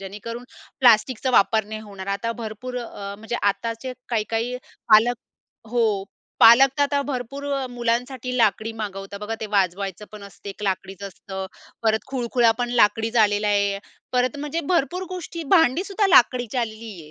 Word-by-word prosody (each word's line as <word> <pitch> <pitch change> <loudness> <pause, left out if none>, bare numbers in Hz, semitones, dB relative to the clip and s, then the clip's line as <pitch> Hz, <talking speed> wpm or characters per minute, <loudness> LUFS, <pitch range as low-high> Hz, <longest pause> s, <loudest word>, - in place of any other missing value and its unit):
जेणेकरून 210 +5 -7 0.4
प्लास्टिकचा 250 +1 +4
वापर 220 -2 +3
नाही 215 +1 -7
होणार, 200 -3 -10
आता 200 +4 -2
भरपूर 235 +2 -7
अ, 200 -4 -7
म्हणजे 225 +2 -4
आताचे 230 +5 -1 0.2
काही-काही 230 +2 -1 0.4
पालक 230 +3 +6 0.5
हो, 220 -4 +1 0.4
पालक 235 +4 +9
तर - - +4
आता 285 0 +1
भरपूर 260 +3 -5
अ, 275 -1 -1
मुलांसाठी 250 +2 -2
लाकडी 225 -1 +1
मागवतात, 200 -2 -6
बघा 210 +2 -4
ते 220 - -3
वाजवायचं 195 0 -1
पण 210 -1 -10
असते 200 0 -12
एक 195 - -11
लाकडीच 195 0 -3
असतं. 190 0 -7 0.4
परत 220 -1 +1
खुळखुळा 240 -2 +2
पण 245 0 -1
लाकडीच 225 +3 +2
आलेला 210 -1 +3
आहे. 200 -1 +1 0.3
परत 250 +1 +1
म्हणजे 295 +3 -3
भरपूर 345 +2 0
गोष्टी, 345 -2 -6
भांडी 325 +1 +3
सुद्धा 400 +1 0
लाकडीची 255 - +4
आलेली 225 -1 -4
आहे. 150 - -15
225 Hz, 155 wpm, -23 LUFS, 205-250 Hz, 0.5 s, पालक